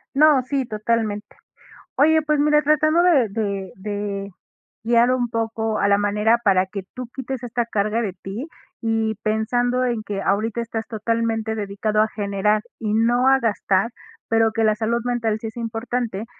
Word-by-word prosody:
No, 295 -1 +6
sí, 270 +1 -1
totalmente. 215 -1 -1 0.7
Oye, 315 +2 +4
pues 300 -1 +1
mira, 300 +1 +4
tratando 310 +3 +3
de 305 -10 +4
de 200 -3 -3
de 200 0 -4 0.5
guiar 235 +2 +4
un 250 -1 +1
poco 225 -1 -2
a 200 - +2
la 200 0 +4
manera 210 +3 +2
para 190 -2 +4
que 190 0 -6
tú 250 -1 -5
quites 265 -1 -5
esta 240 0 -1
carga 215 0 0
de 205 -5 -2
ti, 195 - -7 0.3
y 225 -1 0
pensando 245 +4 +1
en 235 -3 -1
que 200 -1 -4
ahorita 215 +4 0
estás 225 -1 -5
totalmente 225 0 -1
dedicado 210 +1 -1
a 215 - +3
generar 210 0 0 0.2
y 215 -2 -2
no 240 +3 +3
a 270 0 +5
gastar, 210 -2 +1 0.4
pero 225 0 +3
que 225 - 0
la 215 -1 +3
salud 230 +2 -1
mental 235 -3 0
sí 225 - -5
es 220 - -9
importante, 230 -2 -3
225 Hz, 170 wpm, -22 LUFS, 210-245 Hz, 0.7 s, No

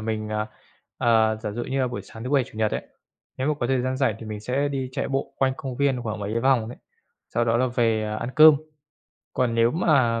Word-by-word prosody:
mình, 110 -1 -3 0.7
à, 110 -2 +3
giả 110 -1 -5
dụ 120 +2 -4
như 135 0 -1
là 130 - +2
buổi 120 -5 -5
sáng 110 +4 -11
thứ 130 - -4
Bảy, 140 -3 +3
Chủ 110 - -13
Nhật 110 -1 +2
ấy, - - -2 0.5
nếu 130 +3 -1
mà 150 - +2
có 120 - +1
thời 130 0 +1
gian 130 +1 -1
rảnh 130 -5 +1
thì 115 - -9
mình 105 -1 -5
sẽ 135 +5 -1
đi 135 -2 -3
chạy 140 - -2
bộ 135 0 -2
quanh 130 -1 +2
công 130 -2 -6
viên 135 -3 +1
khoảng 110 -2 -4
mấy 105 +3 -2
vòng 125 -4 +2
đấy, 120 - -9 0.6
sau 120 - +2
đó 115 0 +2
là 130 - +2
về, 115 -3 +1
à, 105 0 -3
ăn 115 +3 -4
cơm. 155 0 +9 0.8
Còn 125 -2 +1
nếu 115 0 +4
mà 130 -8 +2
120 Hz, 245 wpm, -24 LUFS, 110-130 Hz, 0.8 s, cơm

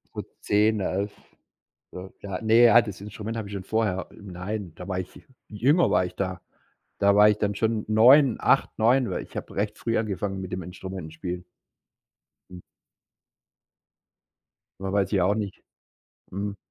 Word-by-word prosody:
Gut, - - -5
10, 105 +1 +2
11, 100 +2 -2 0.8
so. 95 +1 -9
Ja, 100 -2 -5
ne, 115 +2 +5
ja, 120 0 +7
das 105 -4 -8
Instrument 105 +2 -6
hatte 110 -3 -4
ich 100 - -9
schon 95 - -4
vorher. 100 -2 -1
Nein, 95 -1 -6
da 90 +2 -10
war 95 - -2
ich 90 -1 -7 0.3
jünger 140 - +3
war - - +2
ich 90 - -6
da. 95 -2 -3 0.6
Da 100 0 +4
war 105 +1 +7
ich 105 - -1
dann 105 -1 0
schon 110 +1 -1
9, 125 +4 +6
8, - - +3
9, 120 +3 +3
weil - - -3
ich - - -13
hab - - -5
recht 105 +1 -2
früh 115 -1 -1
angefangen 100 -2 -3
mit 95 -1 -6
dem 95 - -3
Instrumentenspielen. 90 0 -7 1.1
Hm. 90 - -10 2.2
W 95 0 -3
weiß 100 -2 +1
ich 95 - +3
auch 95 +3 +2
nicht. 105 -3 -5 0.7
Mhm. 100 +2 -4
100 Hz, 160 wpm, -25 LUFS, 95-110 Hz, 2.2 s, ja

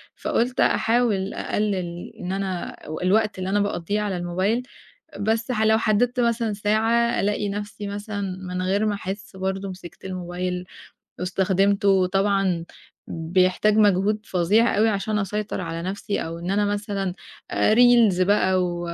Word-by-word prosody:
فقُلت 245 +2 -1
أحاول 225 -4 +2
أقلِّل 185 -5 -2
إن 180 +1 -4
أنا 190 -2 -3
و 155 - -5
الوقت 210 +2 +2
اللي 185 0 -3
أنا 205 - +2
باقضّيه 200 +1 -1
على 200 -3 -2
الموبايل، 185 +7 0 0.6
بس 225 +3 0
ح 220 -2 0
لو 220 0 +4
حدّدت 230 +3 +1
مثلًا 235 -2 +1
ساعة، 225 +3 +1
ألاقي 205 0 0
نفسي 205 +1 -5
مثلًا 205 -2 -4
من 180 0 -4
غير 200 +3 +1
ما 210 - +1
أحِسّ 195 0 -6
برضه 190 +1 -3
مسكت 180 -2 -11
الموبايل 180 0 -4 0.6
واستخدمته، 195 +2 +1
وطبعًا 195 -2 +2 0.5
بيحتاج 185 +5 +2
مجهود 205 0 +3
فظيع 200 +7 +2
أوي 220 +1 +4
عشان 210 +1 -1
أسيطر 210 +1 -3
على 165 0 -4
نفسي، 200 +3 -3
أو 165 +1 -6
إن 175 +2 -4
أنا 205 +1 +2
مثلًا 205 -2 -2 0.4
آآ، 215 - +3
Reels 235 -6 +5
بقى 185 -1 +3
و 175 -1 -3
200 Hz, 145 wpm, -23 LUFS, 185-215 Hz, 0.6 s, Reels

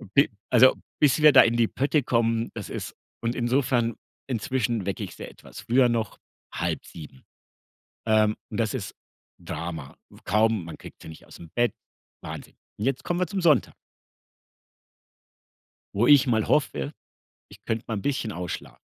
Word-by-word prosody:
Bi 140 - +5 0.2
also 130 +1 +7 0.3
bis 150 +1 +4
wir 150 -1 +9
da 130 - +10
in 115 +1 +3
die 115 -1 +3
Pötte 145 +3 +1
kommen, 115 -1 +1
das 110 -4 -7
ist - - -6 0.3
und 115 +1 -1
insofern 120 -2 +1 0.3
inzwischen 120 -3 -1
wecke 100 - -3
ich - - -7
sie - - -7
etwas - - -12
früher 125 +3 +3
noch, 115 -4 -2 0.4
06:30. 75 -5 -5 0.8
Ähm, 110 -1 +3
und 110 - -5
das 110 0 0
ist 100 -7 -5 0.5
Drama. 80 -4 -6
W - - -17
kaum 110 -2 +2
man 85 - -8
kriegt - - -13
sie - - -10
nicht 80 - -12
ausm 85 - -13
Bett, 120 0 +2 0.5
Wahnsinn. - - -8 0.2
Und 105 - -2
jetzt 135 -1 -1
kommen 175 0 -1
wir 180 - +1
zum 195 -2 -3
Sonntag 155 -7 +3 2.2
wo 115 +4 +2
ich 140 -2 +7
mal 110 -4 +1
hoffe, 150 0 0 0.6
ich 100 0 -16
könnte 115 0 -2
mal 110 - -2
'n - - -4
bisschen 125 -5 -1
ausschla 90 -1 -6
115 Hz, 160 wpm, -26 LUFS, 105-130 Hz, 2.2 s, da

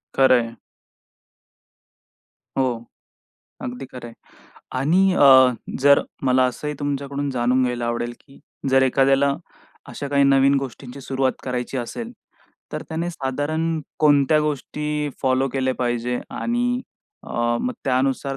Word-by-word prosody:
खरं 130 -2 +5
आहे,. 115 0 -8 2.0
हो, 125 -3 0 0.8
अगदी 125 +2 -6
खरं 125 -2 -8
आहे. 115 - -11 0.6
आणि 180 +8 +3
अ, 130 -5 +7 0.3
जर 140 +1 +6 0.2
मला 130 0 +4
असंही 150 +4 -4
तुमच्याकडून 140 0 -3
जाणून 125 0 +1
घ्यायला 120 -1 -2
आवडेल, 120 0 -2
की 135 - -19 0.3
जर 135 0 +5
एखाद्याला 135 +1 +3 0.5
अशा 140 - -6
काही 140 0 +3
नवीन 135 0 +4
गोष्टींची 135 0 -7
सुरुवात 130 0 0
करायची 125 0 -3
असेल, 230 - -5 0.6
तर - - -4
त्याने 165 +1 -2
साधारण 155 +3 -2 0.2
कोणत्या 145 0 +4
गोष्टी 150 0 -2
फॉलो 130 +1 +2
केल्या 130 -1 -1
पाहिजे? 120 0 -1
आणि 245 +1 -1 0.4
अ, - - -11 0.3
मग 250 - -1
त्यानुसार 135 +1 0
135 Hz, 120 wpm, -22 LUFS, 130-145 Hz, 2.0 s, अ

